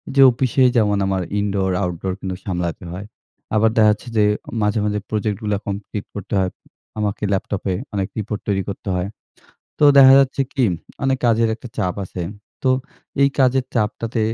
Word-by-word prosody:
যে 140 - +6
অফিসে 130 +2 +1
যেমন 105 -2 +3
আমার 95 -1 0 0.2
indoor 100 -2 0
outdoor 90 +1 -2
কিন্তু 95 -1 -4
সামলাতে 90 -2 -3
হয়। 95 +3 -6 0.5
আবার 110 +1 +4
দেখা 110 -1 +6
যাচ্ছে 105 +4 -4
যে 105 - +5 0.4
মাঝে, 105 +1 +1
মাঝে, 105 0 0
project 105 -2 -1
গুলা 105 -1 0
কমপ্লিট 100 0 -4
করতে 100 0 -6
হয়। 95 -1 +1 0.5
আমাকে 105 0 -2
laptop 95 0 -2
এ - - 0 0.2
অনেক 100 -1 -1
রিপোর্ট 105 0 -4
তৈরি 100 -2 +1
করতে 100 0 -7
হয়। 90 +2 -1 0.7
তো 150 - +4
দেখা 135 -1 +9
যাচ্ছে 135 0 +2
কি 135 - +2 0.4
অনেক 135 -1 +2
কাজের 115 0 +3
একটা 120 +2 -10
চাপ 90 -1 0
আছে। 90 -1 -6 0.4
তো 130 - +3 0.5
এই 140 - +6
কাজের 130 -1 +3
চাপটাতে 115 +1 -1
105 Hz, 170 wpm, -20 LUFS, 95-115 Hz, 0.7 s, দেখা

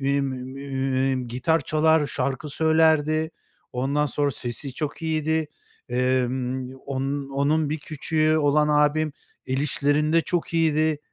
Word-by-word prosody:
emm, 135 -1 -1
gitar 145 +7 +1
çalar, 155 -1 +2
şarkı 135 +2 -3
söylerdi, 160 0 +2 0.4
ondan 140 +4 0
sonra 145 0 0
sesi 125 +1 -2
çok 150 +3 -4
iyiydi, 160 -1 0 0.4
emm, 125 +1 -1
onun 140 +1 -3
onun 145 +2 +1
bir 155 - -1
küçüğü 155 +1 0
olan 150 0 +3
abim 150 +1 +2 0.3
el 130 0 -1
işlerinde 150 +3 +2
çok 170 0 -2
iyiydi, 155 -2 +2
145 Hz, 115 wpm, -24 LUFS, 135-155 Hz, 0.4 s, olan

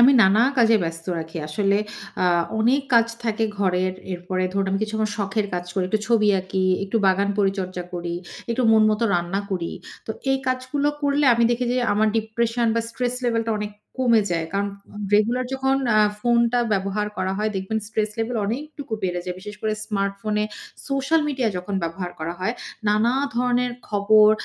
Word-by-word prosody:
আমি 255 +3 +8
নানা 205 +3 +5
কাজে 230 -2 +5
ব্যস্ত 165 0 -5
রাখি। 160 +1 -7
আসলে 200 +5 +1 0.5
আ - - +3 0.3
অনেক 245 +6 +3
কাজ 230 -1 +6 0.2
থাকে 225 -1 0
ঘরের 185 -1 +1 0.2
এরপরে 185 +1 -3
ধরুন 195 0 0
আমি 195 - +1
কিছু 215 0 -3
আমার 215 -1 0
শখের 205 +1 -1
কাজ 175 0 -2
করি, 190 -1 0
একটু 215 +2 0
ছবি 220 -3 +4
আঁকি। 190 0 -1 0.2
একটু 200 +3 -2
বাগান 195 +1 +3
পরিচর্যা 190 -2 0
করি, 170 -1 -3 0.4
একটু 235 +2 0
মন 220 -1 +6
মত 215 +1 0
রান্না 175 +3 0
করি। 175 -3 -2 0.3
তো - - -4 0.2
এই 270 - +3
কাজগুলো 255 +3 0
করলে 285 +1 +2
আমি 235 0 +3
দেখি 240 +1 0
যে - - 0 0.2
আমার 215 +1 +3
ডিপ্রেশন 230 +2 0
বা 230 - +2
স্ট্রেস 245 +1 -2
লেভেলটা 230 -1 +1
অনেক 210 0 -3 0.3
কমে 235 -3 +5
যায়। 165 -2 0
কারণ 200 +1 0 0.5
রেগুলার 235 +5 +3
যখন 265 0 +1 0.2
আ - - +6 0.2
ফোনটা 235 +1 +3
ব্যবহার 200 +1 0
করা 185 0 -1
হয় 215 +1 0
দেখবেন 190 +4 -2
স্ট্রেস 215 -1 -1
লেভেল 230 +2 -1
অনেকটুকু 285 +3 -5
বেড়ে 180 -1 -1
যায়। 180 -1 -4
বিশেষ 210 +2 -8
করে 215 -1 +1
স্মার্টফোনে 210 0 -1 0.4
সোশ্যাল 275 +4 +2
মিডিয়া 260 -5 0
যখন 180 +3 -4
ব্যবহার 175 +2 -3
করা 165 +2 -3
হয় 215 +6 0 0.3
নানা 215 +3 +3 0.2
ধরনের 245 0 +1 0.2
খবর, 210 +1 +5
215 Hz, 175 wpm, -23 LUFS, 190-235 Hz, 0.5 s, আমি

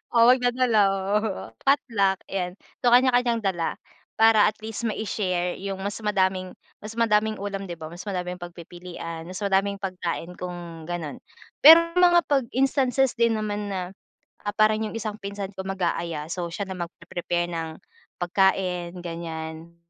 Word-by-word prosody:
Oh, 235 +1 +8
magdadala 245 -3 +2 0.9
potluck, 210 -9 +3 0.2
ayan. 180 -1 -2 0.2
So, 245 - 0
kanya-kanyang 245 -2 +4
dala 175 -4 -1 0.4
para 225 -1 +6
at 215 - -1
least 225 +1 -3
mai-share 185 -4 -2
yung 195 0 -4
mas 200 +2 -3
madaming 190 -3 0 0.2
mas 215 +2 -8
madaming 220 -1 +2
ulam, 200 -1 -5
di 175 - -5
ba? 160 0 -9
Mas 175 +4 -9
madaming 180 -2 -3
pagpipilian, 175 -1 -8
mas 185 +3 -6
madaming 200 0 +2
pagkain 180 -3 -4
kung 175 -2 -7
ganon. 165 -5 -4 0.4
Pero 335 +3 +9
mga 350 -2 +6
pag 275 -4 +1
instances 270 -1 +2
din 230 -1 +4
naman 210 -1 -2
na, 190 -2 -2 0.7
ah, 205 - -2
parang 215 0 +4
yung 225 - -8
isang 215 -1 -4
pinsan 200 0 -5
ko 190 -1 -7
mag-aaya. 170 -4 -2
So, 175 -2 -2
siya 175 +4 -4
na 185 -1 -6
magpe-prepare 175 0 -3
ng 165 -1 -3 0.5
pagkain, 180 -1 +1
ganyan. 165 -1 -6
195 Hz, 145 wpm, -25 LUFS, 175-220 Hz, 0.9 s, Pero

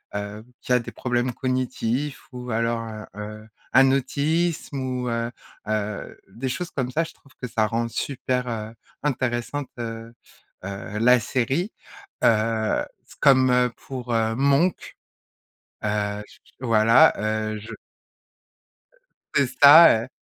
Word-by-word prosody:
heu, 105 +1 -5 0.2
qui 125 - 0
a 125 - +5
des 115 - -8
problèmes 125 0 -1
cognitifs 130 +2 -2
ou 125 -1 -8
alors, 115 0 0
heu 110 -1 -8 0.2
heu, 110 +1 -8 0.2
un 135 0 +6
autisme 145 +3 0
ou, 125 -1 -2
heu 115 0 -1 0.4
heu, 105 -1 -3
des 120 +7 -4
choses 180 +7 -4
comme 130 -3 -2
ça. 160 +6 0
Je 165 - -9
trouve 140 - -24
que 125 - -4
ça 110 -2 +1
rend 115 +1 -1
super, 125 +1 -2
heu, 110 -2 -4 0.3
intéressante, 130 0 -2
heu 115 -1 -6 0.5
heu, 100 +2 -6
la 125 +2 +5
série, 130 - -1 0.5
heu, 110 0 +2 0.4
comme 130 -3 +4
pour, 125 -3 -6
heu, 115 0 +1
Monk. 140 +7 +1 0.9
Heu 105 -1 -1
j - - -19
j - - -25
voilà, 115 -1 +5
heu, 110 0 -2
je 110 +2 -12 1.7
C'est 140 - +4 0.2
ça, 145 -5 +9
heu - - -12
120 Hz, 135 wpm, -24 LUFS, 110-130 Hz, 1.7 s, ça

